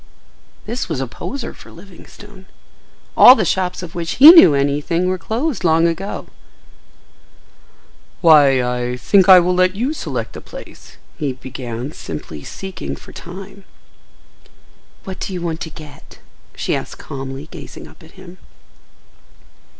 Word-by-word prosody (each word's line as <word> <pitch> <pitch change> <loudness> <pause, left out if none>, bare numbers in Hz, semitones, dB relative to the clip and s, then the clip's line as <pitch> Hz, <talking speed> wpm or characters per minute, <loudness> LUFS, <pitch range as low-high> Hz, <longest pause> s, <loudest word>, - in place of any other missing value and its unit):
This 235 -2 -4
was 160 -5 -3
a 135 - -2
poser 235 - -7
for - - -16
Livingstone. 190 +2 -15 0.7
All 250 - +9
the 215 - -1
shops 180 0 -2
of 165 - -9
which 170 -1 -4
he 295 +5 +10
knew 325 - +7
anything 145 +6 0
were 185 0 -1
closed 235 - -3
long 165 0 +3
ago. 175 +4 -4 2.0
"Why, 145 -5 +5
I 125 0 -3
think 190 +8 +3
I 185 -1 +10
will 180 +1 +1
let 185 +1 +2
you 250 +8 -2
select - - -5
the - - -9
place," - - -13 0.2
he 145 -4 -2
began, 125 0 -7
simply 75 - -8
seeking 190 -3 -7
for - - -15
time. 195 +3 -11 1.4
"What 190 -1 -8
do 195 - -5
you 180 - -5
want 165 -1 -4
to 160 - -5
get?" 150 -2 -14 0.4
she - - -2
asked - - -6
calmly, 135 +2 -8
gazing - - -11
up - - -19
at 160 - -17
him. 185 -1 -14
170 Hz, 140 wpm, -18 LUFS, 140-190 Hz, 2.0 s, he